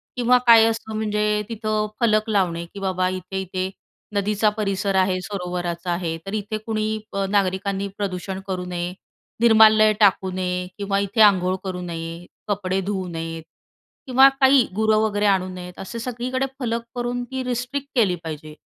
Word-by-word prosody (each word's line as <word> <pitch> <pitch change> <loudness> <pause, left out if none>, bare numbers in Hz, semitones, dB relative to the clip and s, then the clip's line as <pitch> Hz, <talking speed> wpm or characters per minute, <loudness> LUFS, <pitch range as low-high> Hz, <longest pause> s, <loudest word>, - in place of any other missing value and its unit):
किंवा 250 0 +4
काय 230 -1 +9
असतं 220 -1 -3
म्हणजे 210 -1 0
तिथं 215 -1 -1
फलक 215 -1 +2
लावणे 175 -5 0
की 200 - -8
"बाबा 185 -1 0
इथे-इथे 185 0 -4 0.5
नदीचा 210 +1 +2
परिसर 195 -1 -1
आहे, 185 -1 +2
सरोवराचा 180 -2 -4
आहे 170 -2 -2
तर 195 - -6
इथे 215 +1 -2
कुणी 215 -1 -1 0.2
अ, 195 0 0
नागरिकांनी 195 0 0
प्रदूषण 190 -1 -4
करू 185 -1 -3
नये, 175 0 -4 0.5
निर्मालय 220 -2 +6
टाकू 195 -2 +3
नये 180 -1 -2
किंवा 200 -1 -1
इथे 200 +3 0
अंघोळ 185 -3 +5
करू 185 -2 -4
नये, 165 0 -6 0.2
कपडे 195 -2 -1
धुवू 190 -2 -3
नयेत 165 -1 -5 0.6
किंवा 265 +1 +7
काही 265 -2 +6
गुरं 220 0 +3
वगैरे 210 -1 0
आणू 190 -2 +2
नयेत." 180 -1 -9
असे 230 +5 -6
सगळीकडे 250 +2 -2
फलक 235 -2 -1
करून 245 0 -2
ती 260 0 -3
रिस्ट्रिक्ट 250 +3 -3
केली 205 -7 +3
पाहिजे 155 -1 -7
200 Hz, 155 wpm, -22 LUFS, 185-220 Hz, 0.6 s, काय